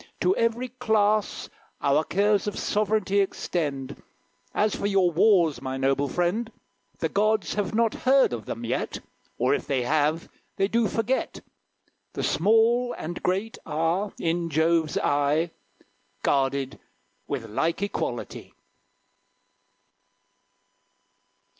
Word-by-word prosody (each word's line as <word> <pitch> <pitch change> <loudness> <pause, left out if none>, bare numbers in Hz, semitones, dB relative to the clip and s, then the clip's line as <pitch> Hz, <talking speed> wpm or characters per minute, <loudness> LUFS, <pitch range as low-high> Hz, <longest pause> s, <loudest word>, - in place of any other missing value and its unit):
To 375 - +3
every 230 +2 0
class 215 -4 +1 0.3
Our 140 +2 +2
cares 205 +3 +1
of 205 - -3
sovereignty 210 -1 +1
extend. 150 -8 -2 0.5
As 210 0 +1
for 200 - -2
your 195 -3 +3
wars, 170 - +3
my 130 0 -4
noble 135 +1 +1
friend, 180 - -1 0.5
The - - -1
gods 215 -2 +1
have 210 +1 -2
not 230 -1 +2
heard 265 - +3
of 110 -3 -5
them 115 +1 -5
yet; 115 - -2 0.4
Or, 125 +3 +2
if - - -2
they 130 -3 0
have, 155 +4 +1 0.3
they 195 - +1
do 230 +1 +2
forget. 230 +5 -1 0.7
The - - -3
small 225 +6 +3
and 175 +2 -6
great 195 +5 -1
are, 165 +6 -1
in 170 0 -1
Jove's 160 0 +2
eye, 145 +4 +1 0.7
Guarded 135 -1 0 0.5
with 130 -5 -4
like 160 - -1
equality." 200 - -4
180 Hz, 115 wpm, -26 LUFS, 145-215 Hz, 0.7 s, To